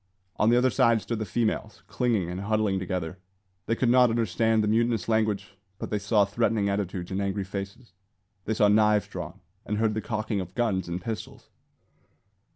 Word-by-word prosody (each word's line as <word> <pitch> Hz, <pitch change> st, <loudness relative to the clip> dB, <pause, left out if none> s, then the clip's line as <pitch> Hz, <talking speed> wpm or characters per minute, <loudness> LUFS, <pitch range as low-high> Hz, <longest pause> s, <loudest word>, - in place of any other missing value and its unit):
On 110 Hz, -, +3 dB
the 120 Hz, -, +5 dB
other 125 Hz, +1 st, +3 dB
side 115 Hz, -3 st, +4 dB
stood 115 Hz, +1 st, -4 dB
the 110 Hz, -, -2 dB
females, 110 Hz, +1 st, -2 dB
clinging 115 Hz, -8 st, 0 dB
and 90 Hz, +2 st, -4 dB
huddling 105 Hz, -1 st, +1 dB
together. 90 Hz, -1 st, -4 dB, 0.5 s
They 115 Hz, -, +1 dB
could 125 Hz, -, 0 dB
not 125 Hz, -1 st, +6 dB
understand 115 Hz, 0 st, +1 dB
the -, -, 0 dB
mutinous 115 Hz, -2 st, +1 dB
language, 110 Hz, -3 st, 0 dB, 0.3 s
but -, -, -6 dB
they 105 Hz, -, 0 dB
saw 105 Hz, 0 st, +3 dB
threatening 105 Hz, 0 st, 0 dB
attitudes 95 Hz, -3 st, -3 dB
and 95 Hz, +1 st, -1 dB
angry 100 Hz, 0 st, -1 dB
faces. 100 Hz, +3 st, -7 dB, 0.5 s
They 110 Hz, -, -1 dB
saw 105 Hz, -, +4 dB
knives 105 Hz, 0 st, +3 dB
drawn, -, -, -7 dB, 0.2 s
and 105 Hz, -, -3 dB
heard 110 Hz, 0 st, +1 dB
the 110 Hz, -, -2 dB
cocking 110 Hz, -1 st, -2 dB
of 90 Hz, 0 st, -9 dB
guns 100 Hz, -7 st, 0 dB
and 85 Hz, +1 st, -2 dB
pistols. 110 Hz, +4 st, -7 dB
105 Hz, 180 wpm, -27 LUFS, 100-115 Hz, 0.5 s, not